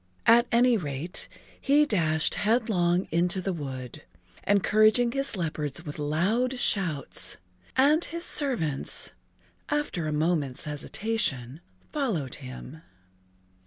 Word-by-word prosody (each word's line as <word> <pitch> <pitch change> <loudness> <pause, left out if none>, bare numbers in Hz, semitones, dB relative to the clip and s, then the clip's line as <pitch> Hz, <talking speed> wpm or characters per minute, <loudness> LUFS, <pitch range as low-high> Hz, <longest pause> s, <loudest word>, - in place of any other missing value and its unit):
At 235 +1 +6
any 240 0 +4
rate, 150 0 -4 0.3
he 290 +2 +4
dashed 160 - +2
headlong 200 -5 +1
into 175 +3 +1
the 185 +1 -2
wood, 130 -6 -7 0.5
encouraging 215 +4 +4
his 275 -1 -2
leopards 160 -2 -3
with 150 0 -7
loud 200 - 0
shouts, 180 - +1 0.4
and 295 +5 +4
his 335 +1 -3
servants, 220 - +1 0.6
after 290 - -2
a - - -2
moment's 150 -4 -1
hesitation, 150 - -2 0.3
followed 210 - -2
him. 130 +4 -10
180 Hz, 105 wpm, -27 LUFS, 150-235 Hz, 0.6 s, At